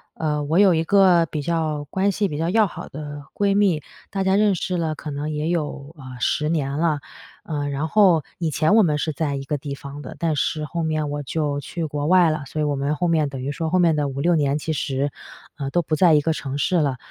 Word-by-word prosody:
呃， 150 Hz, -2 st, -1 dB
我 160 Hz, +5 st, +2 dB
有 195 Hz, -3 st, +6 dB
一 160 Hz, -, +1 dB
个 185 Hz, -4 st, +5 dB
比 150 Hz, -1 st, -4 dB
较 155 Hz, -2 st, -1 dB
关 195 Hz, +1 st, +1 dB
系 200 Hz, +1 st, 0 dB
比 145 Hz, -, -4 dB
较 165 Hz, +2 st, -1 dB
要 215 Hz, +2 st, +4 dB
好 -, -, -8 dB
的 145 Hz, 0 st, -7 dB
闺 200 Hz, -1 st, +1 dB
蜜， 190 Hz, -7 st, +3 dB, 0.3 s
大 195 Hz, -1 st, -2 dB
家 190 Hz, 0 st, +2 dB
认 205 Hz, -2 st, +3 dB
识 180 Hz, +1 st, -2 dB
了 160 Hz, -2 st, -1 dB
可 150 Hz, -, -7 dB
能 145 Hz, +2 st, -3 dB
也 150 Hz, +1 st, -2 dB
有， 150 Hz, -3 st, -3 dB
呃， 145 Hz, -, -12 dB, 0.2 s
10 150 Hz, +3 st, +1 dB
年 145 Hz, -4 st, 0 dB
了。 155 Hz, -2 st, +1 dB, 0.4 s
呃， 145 Hz, -3 st, -3 dB
然 145 Hz, +3 st, -2 dB
后 185 Hz, -5 st, +4 dB, 0.2 s
以 165 Hz, -2 st, 0 dB
前 155 Hz, +4 st, +2 dB
我 225 Hz, -, +7 dB
们 155 Hz, -7 st, +2 dB
是 155 Hz, +1 st, -1 dB
在 145 Hz, -2 st, -1 dB
一 135 Hz, -, -4 dB
个 145 Hz, +2 st, -2 dB
地 140 Hz, -1 st, -5 dB
方 140 Hz, +1 st, -9 dB
的， 140 Hz, -, -9 dB
但 165 Hz, -2 st, 0 dB
是 155 Hz, +1 st, -1 dB
后 170 Hz, +3 st, -4 dB
面 155 Hz, -2 st, -1 dB
我 145 Hz, -, -3 dB
就 145 Hz, 0 st, -2 dB
去 165 Hz, +3 st, -4 dB
国 145 Hz, -1 st, -3 dB
外 175 Hz, -2 st, +5 dB
了， 155 Hz, -2 st, -3 dB
所 155 Hz, -, -5 dB
以 -, -, +1 dB
我 145 Hz, -1 st, 0 dB
们 140 Hz, +2 st, -1 dB
后 175 Hz, +3 st, 0 dB
面 155 Hz, -3 st, +2 dB
等 135 Hz, -1 st, -7 dB
于 140 Hz, -, -3 dB
说 160 Hz, +1 st, -3 dB
后 185 Hz, -, +2 dB
面 170 Hz, -3 st, +4 dB
的 145 Hz, -1 st, 0 dB
5-6 140 Hz, +6 st, +1 dB
年 145 Hz, -2 st, +1 dB
其 160 Hz, +1 st, -3 dB
实， 140 Hz, -1 st, -1 dB, 0.5 s
呃， 135 Hz, -1 st, -3 dB
都 175 Hz, +4 st, +1 dB
不 155 Hz, -, -1 dB
在 165 Hz, 0 st, +5 dB
一 150 Hz, -, +4 dB
个 160 Hz, +2 st, 0 dB
城 140 Hz, -2 st, -4 dB
市 180 Hz, +5 st, +1 dB
了。 140 Hz, -5 st, +1 dB
155 Hz, 265 characters per minute, -22 LUFS, 145-170 Hz, 0.5 s, 我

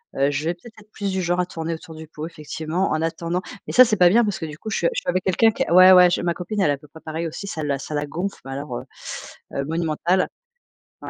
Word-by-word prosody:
heu, 140 Hz, +1 st, +2 dB
je 145 Hz, +2 st, -2 dB
vais 170 Hz, -, +1 dB
peut-être, 220 Hz, +5 st, -15 dB
être 215 Hz, 0 st, -20 dB
plus 200 Hz, -2 st, -3 dB
du 190 Hz, 0 st, -1 dB
genre 175 Hz, +1 st, +1 dB
à -, -, -1 dB
tourner 165 Hz, -2 st, -4 dB
autour 160 Hz, 0 st, -9 dB
du 160 Hz, 0 st, -9 dB
pot 155 Hz, 0 st, -7 dB
effectivement 160 Hz, +2 st, -3 dB
en 155 Hz, -, 0 dB
attendant. 170 Hz, +2 st, -2 dB, 0.3 s
Mais -, -, -5 dB
ça 255 Hz, -, +9 dB
c'est 220 Hz, -4 st, +1 dB
pas 180 Hz, -, +7 dB
bien 230 Hz, +7 st, +5 dB
parce 205 Hz, -3 st, -2 dB
que 160 Hz, -, -4 dB
du 150 Hz, -1 st, -8 dB
coup 220 Hz, -, -7 dB
je -, -, -1 dB
suis 170 Hz, -, +2 dB
je -, -, -2 dB
suis -, -, -4 dB
avec 185 Hz, +1 st, 0 dB
quelqu'un 225 Hz, +4 st, +4 dB
qui -, -, -2 dB
ouais, 185 Hz, +2 st, +8 dB
ouais 180 Hz, -1 st, +8 dB
je -, -, 0 dB
ma 175 Hz, -1 st, 0 dB
copine 195 Hz, +4 st, -3 dB
elle 170 Hz, -, +3 dB
est 145 Hz, -, +3 dB
à -, -, -4 dB
peu 150 Hz, +2 st, -17 dB
près 160 Hz, +2 st, -15 dB
pareil 160 Hz, +1 st, -4 dB
aussi, 180 Hz, +5 st, -7 dB
ça 160 Hz, -5 st, -4 dB
la 140 Hz, -2 st, -1 dB
ça 150 Hz, -, -7 dB
la 145 Hz, -, -1 dB
gonfle 175 Hz, +7 st, -4 dB
mais 135 Hz, -, -7 dB
alors, 135 Hz, -2 st, -5 dB
heu -, -, -7 dB, 0.7 s
heu, 140 Hz, -, -2 dB
monumental! 165 Hz, +3 st, 0 dB, 0.7 s
Ouais, -, -, -7 dB
170 Hz, 300 wpm, -22 LUFS, 155-185 Hz, 0.7 s, ça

